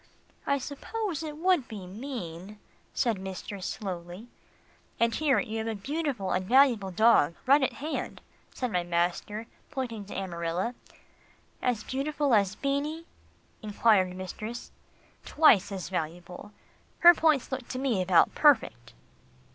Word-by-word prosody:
"I 280 - +2
suppose 325 - -4
it 305 -2 -6
would 350 -5 +2
be 205 -4 -8
mean," 200 -3 -7 0.3
said 230 -6 0
mistress 190 0 -6
slowly. 185 +2 -6 0.7
"And 230 0 +2
here 295 -4 +2
you 220 +1 -3
have 220 - -3
a 225 - -2
beautiful 270 - -3
and 185 - 0
valuable 240 -3 +4
dog 185 -5 +4
right 280 +3 +5
at 265 - 0
hand," 305 +3 -5 0.3
said 250 -3 -3
my 180 -3 +1
master, 175 +5 -2 0.2
pointing 245 -8 -5
to 205 - -9
Amarilla. 180 +3 -3 0.9
"As 240 -4 0
valuable 285 0 -1
as 200 -2 +3
Beanie?" 290 +4 -2 0.6
enquired 205 -3 +2
mistress. 215 +5 -7 0.5
"Twice 240 - +4
as 185 -3 -5
valuable. 175 +3 -5 0.5
Her 345 0 +10
points 310 -6 +2
look 260 -2 -4
to 255 - -5
me 255 -7 0
about 180 -2 +4
perfect." 220 - +2
220 Hz, 130 wpm, -28 LUFS, 185-275 Hz, 0.9 s, Her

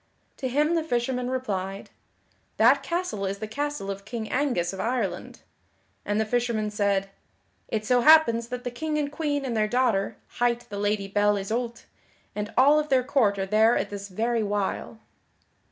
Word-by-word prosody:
To 265 - -3
him 295 +6 +1
the 330 -2 +1
fisherman 250 -3 -1
replied: 195 -7 -3 0.7
"That - - +5
castle 340 - -3
is 195 +1 -3
the 215 +1 -5
castle 285 -4 -3
of 195 0 -7
King 220 +1 -5
Angus 245 -11 0
of 190 - -7
Ireland." 225 -7 -3 0.6
And 205 +1 0
the 220 - +1
fisherman 230 -2 -1
said: 200 -2 0 0.6
"It 215 -1 -2
so 250 +2 +3
happens 235 -6 +6
that 250 +1 -6
the 245 - -3
King 305 +5 -3
and 290 -1 -1
Queen 290 -2 -2
and 245 -3 -2
their 215 -1 +2
daughter, 235 -4 +1 0.2
hight 240 0 +2
the 200 - -4
Lady 205 -1 0
Belle 205 +1 +2
Isoult, 230 +4 -3 0.5
and 210 0 -4
all 285 +4 +6
of 300 0 -3
their 260 -2 +3
court 245 -7 +2
are 195 - -1
there 220 +4 +4
at - - -2
this 200 0 -6
very 230 +4 0
while." 205 +1 -2
230 Hz, 175 wpm, -26 LUFS, 205-260 Hz, 0.7 s, happens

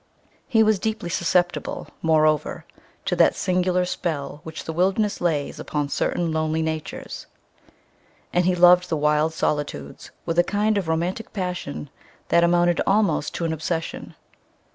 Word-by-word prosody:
He 225 -2 +4
was 215 -2 +3
deeply 220 -4 -2
susceptible, 175 +1 0
moreover, 155 -2 +2 0.4
to - - 0
that - - +5
singular 180 0 +1
spell 145 -5 -3
which 160 0 -8
the 160 - -5
wilderness 195 +5 +1
lays 155 -5 -1
upon 145 -1 -2
certain 170 +3 -1
lonely 160 0 0
natures, 160 -1 -5 1.1
and 175 0 +2
he 180 0 +3
loved 180 0 +6
the 160 - 0
wild 150 +1 +2
solitudes 145 - -3 0.2
with 165 0 0
a - - +6
kind 210 +3 +1
of 185 - -5
romantic 170 +7 -2
passion 180 - -4 0.4
that 170 - +4
amounted 175 0 +3
almost 195 -7 +1
to 170 - -2
an 160 - 0
obsession. 165 +1 -4
170 Hz, 140 wpm, -23 LUFS, 155-180 Hz, 1.1 s, loved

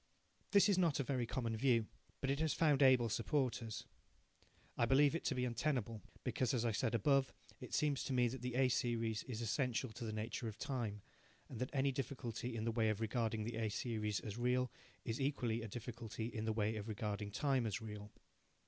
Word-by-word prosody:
This 200 0 +6
is 195 -3 +3
not 165 -6 +3
a - - +2
very 125 -3 -1
common 115 -2 -1
view, 115 -1 +3 0.4
but 135 - +1
it 140 - 0
has 160 -1 +1
found 150 -4 +4
able 130 -3 +6
supporters. 115 0 -1 0.9
I 115 - +2
believe 140 +2 +5
it 165 - -2
to 135 - +1
be 125 0 +1
untenable, 120 -3 -1 0.2
because, 130 0 +1
as 120 -1 0
I 115 - +2
said 110 +2 0
above, 135 +4 +3 0.3
it - - -4
seems 145 -3 +1
to - - -3
me 125 -1 +4
that 130 +1 -6
the 125 -1 -3
A 130 0 +4
series 115 -3 0
is 120 -4 -4
essential 125 +1 0
to 120 - -7
the 110 - -2
nature 110 +2 -3
of 105 -1 -6
time, 110 -6 -3 0.5
and 120 - -7
that 125 - -1
any 135 0 +2
difficulty 125 -3 -4
in 110 - -2
the 115 - +1
way 110 -1 +2
of 110 -1 0
regarding 110 -1 0
the 115 +1 -4
A 110 -1 0
series 105 -1 -1
as 105 +1 -6
real 125 +1 +2 0.3
is 115 +3 -2
equally 125 -5 0
a 115 - -4
difficulty 115 0 -5
in 110 -1 -3
the 110 - +1
way 110 0 0
of 105 0 -5
regarding 105 -1 -3
time 130 +1 +1
as 105 - -2
real. 105 -2 -7
120 Hz, 210 wpm, -38 LUFS, 110-130 Hz, 0.9 s, This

